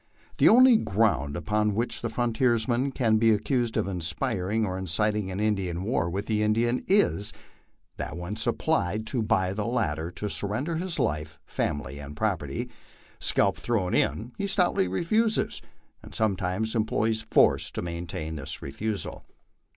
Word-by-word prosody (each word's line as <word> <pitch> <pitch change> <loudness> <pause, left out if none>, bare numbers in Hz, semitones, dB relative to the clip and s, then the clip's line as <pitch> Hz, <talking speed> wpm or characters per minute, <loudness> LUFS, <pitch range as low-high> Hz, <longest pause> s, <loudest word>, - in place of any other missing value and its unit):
The - - +7
only 250 0 +7
ground 95 - +1
upon 105 +5 0
which 115 +3 -2
the - - -2
frontiers 120 -1 +1
man 130 +3 +1
can 115 -5 +2
be 115 +1 +4
accused 110 +2 +1
of - - 0
inspiring 100 +3 -1
or 95 -2 -3
inciting 95 +3 0
a 100 -2 0
war 95 -4 0
with 100 +4 -3
the 105 -1 0
Indian 115 +3 +1
is, 145 - +3 0.7
that 80 - -5
when 90 +4 -5
applied 110 - 0
to 115 +2 -2
by 105 -4 +1
the 105 +2 -2
latter 85 -10 -1
to 105 +4 -5
surrender 120 +12 -2
his 180 0 -1
life, 75 +1 -2
family, 70 -2 -3
and 75 +1 -9
property, - - -2 0.5
scalp - - +2
thrown 105 -7 -1
in, 115 +4 0
he 200 - -1
stoutly 180 - +2
refuses, 215 - +1 0.4
and - - -11
sometimes 105 0 0
employs 110 0 0
force - - +4
to - - -5
maintain 85 -2 -5
this 65 - -4
refusal. 105 +9 -4
105 Hz, 150 wpm, -27 LUFS, 90-120 Hz, 0.7 s, The